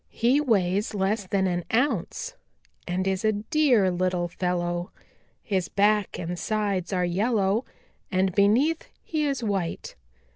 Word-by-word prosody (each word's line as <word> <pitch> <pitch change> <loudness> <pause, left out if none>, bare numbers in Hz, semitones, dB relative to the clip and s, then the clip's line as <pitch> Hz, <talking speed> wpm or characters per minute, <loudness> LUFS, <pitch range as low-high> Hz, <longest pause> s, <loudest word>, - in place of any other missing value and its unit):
He 250 +5 +2
weighs 205 -5 +1
less 200 +1 0
than 190 0 +1
an 175 -1 -1
ounce 235 - 0 0.5
and 185 +2 -1
is 190 +1 -1
a 215 0 +3
dear 225 - +2
little 180 -1 0
fellow. 175 0 -2 0.5
His 190 -4 -1
back 205 0 +2
and 175 0 -4
sides 200 -4 -1
are 180 -2 +1
yellow, 200 +4 +1 0.5
and 185 0 +1
beneath 240 - +3 0.2
he 310 -2 -1
is 275 -4 -1
white. 195 -6 -2
195 Hz, 135 wpm, -26 LUFS, 180-220 Hz, 0.5 s, a